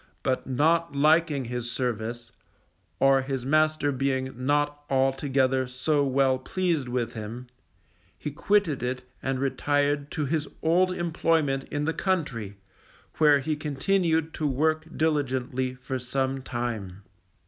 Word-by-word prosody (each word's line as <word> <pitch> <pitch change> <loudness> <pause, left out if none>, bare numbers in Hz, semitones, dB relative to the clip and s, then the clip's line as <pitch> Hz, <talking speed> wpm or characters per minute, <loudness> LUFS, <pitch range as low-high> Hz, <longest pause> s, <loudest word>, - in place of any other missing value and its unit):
But 130 -1 -1
not 160 +4 +2
liking 150 -1 +3
his 120 0 -4
service, 120 -1 -3 0.7
or 135 0 +5
his 130 -1 -3
master 155 0 +2
being 130 -1 -1
not 145 +3 0
altogether 135 -1 +1
so 145 +4 +1
well 135 -1 +2
pleased 165 -1 -1
with 120 -1 -2
him, 115 +3 -6 0.7
he 150 - -5
quitted 185 -1 +1
it 125 +1 -2 0.2
and 135 0 -1
retired 145 +1 0
to 150 - -1
his 155 +1 -1 0.2
old 180 +3 +3
employment 165 -5 0
in 145 0 -3
the 160 - 0
country, 130 - -2 0.6
where 150 -2 +6
he 155 +3 -1
continued 160 +2 0
to 155 - -1
work 155 +3 +1
diligently 130 -4 0
for 130 +1 -4
some 130 +1 -1
time. 115 -7 -4
135 Hz, 125 wpm, -27 LUFS, 130-155 Hz, 0.7 s, where